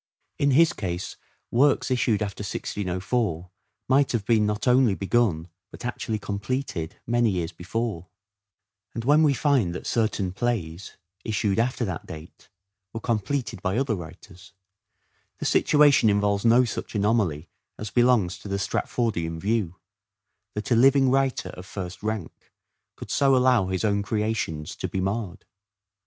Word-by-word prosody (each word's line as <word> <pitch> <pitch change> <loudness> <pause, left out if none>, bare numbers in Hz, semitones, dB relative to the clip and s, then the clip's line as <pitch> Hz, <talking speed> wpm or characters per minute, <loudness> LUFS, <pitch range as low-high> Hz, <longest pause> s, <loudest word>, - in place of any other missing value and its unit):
In 140 - +3
his 165 +5 +5
case 90 -3 -4 0.4
works 135 +2 +3
issued 115 -4 +1
after 100 0 -5
1604 95 -2 -2 0.4
might 135 +1 +3
have 110 -4 -1
been 110 -2 +3
not 105 +4 -2
only 125 -4 +4
begun 95 -4 +1 0.2
but - - -10
actually 115 -2 -3
completed 100 -3 -4
many 120 0 +2
years 90 -4 -2
before; 95 +1 -4 0.9
and 115 - -4
when 150 +3 +5
we 145 -3 +4
find 125 - +1
that - - -7
certain 105 -5 0
plays, 100 -6 -3 0.3
issued 105 -2 0
after 120 +1 0
that 95 -4 -5
date, 80 +1 -11 0.4
were 115 - -4
completed 115 -1 -2
by 95 +2 -1
other 135 -3 +1
writers, 90 +1 -10 0.8
the - - -5
situation 145 -6 +4
involves 100 0 +1
no 120 +2 +5
such 115 - -6
anomaly 100 -7 +1 0.3
as 105 -1 -6
belongs 120 -8 +2
to - - -10
the 100 0 -1
Stratf 100 - -3
ordian 85 -9 -1
view: 100 -3 -1 0.8
that 105 +4 -4
a - - +5
living 135 +2 +5
writer 135 -1 +1
of 90 +1 -10
first 90 -3 -7
rank 105 -4 -5 0.4
could - - -9
so 135 -1 +3
allow 125 -6 +3
his 95 +2 -1
own 100 -1 +1
creations 105 -8 -2
to - - -3
be 95 - -3
marred. 95 0 -3
105 Hz, 145 wpm, -25 LUFS, 95-120 Hz, 0.9 s, his